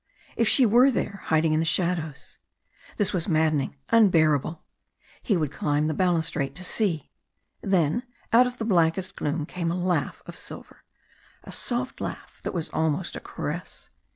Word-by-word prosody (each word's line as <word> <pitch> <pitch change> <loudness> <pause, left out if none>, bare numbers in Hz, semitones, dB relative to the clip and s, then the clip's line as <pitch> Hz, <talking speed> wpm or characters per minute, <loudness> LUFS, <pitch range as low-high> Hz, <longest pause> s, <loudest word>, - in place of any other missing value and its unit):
If 230 - +2
she 260 +3 +5
were 240 +5 +6
there 200 -5 -2
hiding 160 0 +2
in 155 - +2
the 165 - +1
shadows. 160 -4 -1 0.6
This 205 -1 +1
was 175 -4 -1
maddening 155 -5 +1
unbearable. 165 - +3 0.6
He 205 - +1
would 155 -4 -1
climb 145 0 0
the 155 - 0
balustrade 160 -5 0
to 185 - -6
see. 180 -6 -1 0.5
Then 175 0 +2 0.3
out 250 +2 +7
of 250 - -6
the 225 - -3
blackest 185 -1 +2
gloom 150 +1 -2
came 170 0 -3
a 170 - -1
laugh 180 0 -1
of - - -9
silver. - - -10 0.6
A - - -10
soft 250 +1 -2
laugh - - -6
that - - -3
was 170 -2 -3
almost 160 +2 -1
a - - -4
caress. - - -6
170 Hz, 160 wpm, -26 LUFS, 155-200 Hz, 0.6 s, out